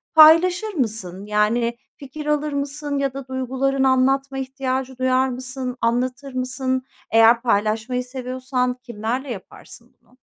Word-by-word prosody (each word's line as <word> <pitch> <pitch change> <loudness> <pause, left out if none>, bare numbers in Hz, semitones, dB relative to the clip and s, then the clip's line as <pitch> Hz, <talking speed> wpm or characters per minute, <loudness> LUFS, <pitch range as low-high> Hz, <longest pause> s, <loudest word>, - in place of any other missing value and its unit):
paylaşır 355 +7 +6
mısın? 210 - -3
Yani, 225 +3 +1 0.2
fikir 290 +2 -8
alır 300 0 0
mısın 285 +1 -3
ya 275 -1 -1
da 275 -1 -7
duygularını 265 +1 0
anlatma 270 +1 +2
ihtiyacı 265 -1 -3
duyar 260 0 +2
mısın, 255 0 -5
anlatır 250 +3 -1
mısın? 255 0 -1 0.3
Eğer 225 +1 +6
paylaşmayı 225 +2 0
seviyorsan 255 0 -2
kimlerle 240 +3 -3
yaparsın 235 +3 -11
bunu? 250 - -28
255 Hz, 120 wpm, -22 LUFS, 245-275 Hz, 0.3 s, paylaşır